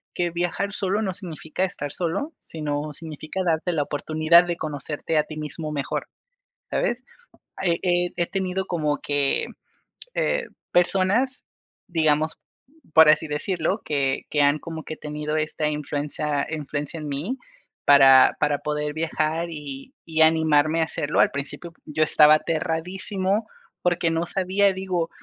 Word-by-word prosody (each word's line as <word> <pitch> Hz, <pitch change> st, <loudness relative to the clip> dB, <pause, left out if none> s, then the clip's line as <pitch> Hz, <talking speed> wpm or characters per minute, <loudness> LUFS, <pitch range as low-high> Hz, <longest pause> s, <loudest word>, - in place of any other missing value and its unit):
que 175 Hz, -1 st, 0 dB
viajar 175 Hz, +3 st, -1 dB
solo 200 Hz, +1 st, 0 dB
no 190 Hz, -4 st, -1 dB
significa 175 Hz, -2 st, -4 dB
estar 145 Hz, -6 st, -4 dB
solo, 180 Hz, -, -2 dB
sino 150 Hz, -1 st, -4 dB
significa 155 Hz, +3 st, -6 dB
darte 170 Hz, +1 st, 0 dB
la 150 Hz, -3 st, +1 dB
oportunidad 155 Hz, +4 st, +4 dB
de 175 Hz, -1 st, -1 dB
conocerte 150 Hz, +1 st, -3 dB
a 150 Hz, -, +4 dB
ti 155 Hz, 0 st, -8 dB
mismo 155 Hz, +1 st, -5 dB
mejor, 140 Hz, -2 st, -3 dB, 0.6 s
¿sabes?, 240 Hz, +1 st, -1 dB, 0.6 s
he 170 Hz, -3 st, +2 dB
he 175 Hz, -1 st, +1 dB
he 175 Hz, -, +1 dB
tenido 190 Hz, 0 st, -2 dB
como 150 Hz, -5 st, -1 dB
que, 145 Hz, -1 st, +1 dB, 0.7 s
eh, -, -, 0 dB, 0.3 s
personas, 195 Hz, +9 st, +2 dB, 0.4 s
digamos, 155 Hz, -2 st, +1 dB, 0.6 s
por 160 Hz, -1 st, +8 dB
así 155 Hz, +1 st, +4 dB
decirlo, 165 Hz, +6 st, -1 dB
que 135 Hz, -3 st, 0 dB
que 150 Hz, -, +2 dB
han 145 Hz, +1 st, +4 dB
como 160 Hz, +1 st, -7 dB
que 155 Hz, -, -6 dB
tenido 150 Hz, +1 st, -4 dB
esta 155 Hz, 0 st, -1 dB
influencia 150 Hz, 0 st, -2 dB
influencia 150 Hz, 0 st, -4 dB
en 155 Hz, -, -6 dB
mí, 155 Hz, -, -3 dB, 0.5 s
para 135 Hz, -2 st, +7 dB
para 145 Hz, -1 st, +2 dB
poder 150 Hz, 0 st, -3 dB
viajar 160 Hz, +1 st, -1 dB
y 145 Hz, -4 st, -8 dB
y 160 Hz, -1 st, +1 dB
animarme 160 Hz, 0 st, +4 dB
a -, -, +4 dB
hacerlo. 150 Hz, -2 st, -1 dB
Al -, -, +5 dB
principio, 145 Hz, +4 st, -6 dB
yo 155 Hz, +1 st, -2 dB
estaba 150 Hz, 0 st, +6 dB
aterradísimo 185 Hz, +6 st, -1 dB, 0.3 s
porque 175 Hz, -1 st, +1 dB
no 165 Hz, +1 st, -1 dB
sabía, 195 Hz, +2 st, +2 dB
digo, 185 Hz, -3 st, -2 dB
160 Hz, 145 wpm, -24 LUFS, 150-175 Hz, 0.7 s, por